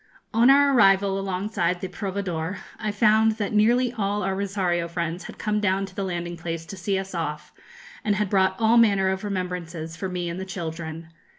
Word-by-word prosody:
On 230 +3 +5
our 280 0 +6
arrival 195 -4 +4
alongside 185 -2 -1
the 190 - -4
'Proveedor,' 185 -3 -3 0.2
I 215 -2 -1
found 220 +1 +4
that 215 -1 -3
nearly 240 +4 +3
all 205 -2 -1
our 195 - 0
Rosario 185 -4 -1
friends 170 +1 -3
had - - -9
come 210 -1 0
down 195 -1 +1
to 190 -1 -13
the 200 - -2
landing 175 -2 -4
place 165 -1 -5
to 195 - -8
see 195 +1 -1
us 190 0 -5
off, 150 -3 -4 0.5
and 210 -1 +1
had 210 0 0
brought 190 -1 +2
all 225 +1 +4
manner 200 -4 +4
of 190 +1 -2
remembrances 180 -4 -4
for 190 +3 -4
me 180 -1 -3
and 170 +2 -4
the - - -3
children. 165 -3 -6
190 Hz, 195 wpm, -25 LUFS, 175-210 Hz, 0.5 s, our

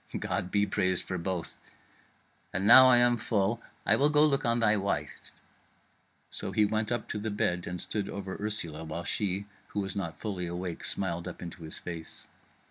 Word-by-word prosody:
God 90 -1 -2
be 100 +1 +2
praised 95 -2 0
for 95 -1 -4
both. 90 -1 -3 0.9
And 95 - -1
now 130 +4 +10
I 125 -1 +7
am 120 0 +5
full, 110 0 0 0.2
I - - +5
will 145 +2 +3
go 150 0 +5
look 145 -1 +1
on 120 -2 +2
thy 110 -2 +4
wife." 100 -1 -3 1.0
So - - -2
he 105 - +3
went 110 +1 -1
up 120 -2 -1
to 105 - -3
the 110 +2 -3
bed 90 -4 -1
and 90 +1 -4
stood 100 +3 -3
over 95 -1 -5
Ursula, 85 -7 -4
while 80 +2 -5
she, 100 +1 -1 0.2
who - - -4
was 95 -2 -3
not 90 -5 -4
fully 95 -5 -3
awake, 85 0 -5
smiled 85 -2 -1
up 90 - -7
into 90 +1 -8
his 80 -1 -6
face. 85 -2 -7
100 Hz, 190 wpm, -29 LUFS, 90-110 Hz, 1.0 s, now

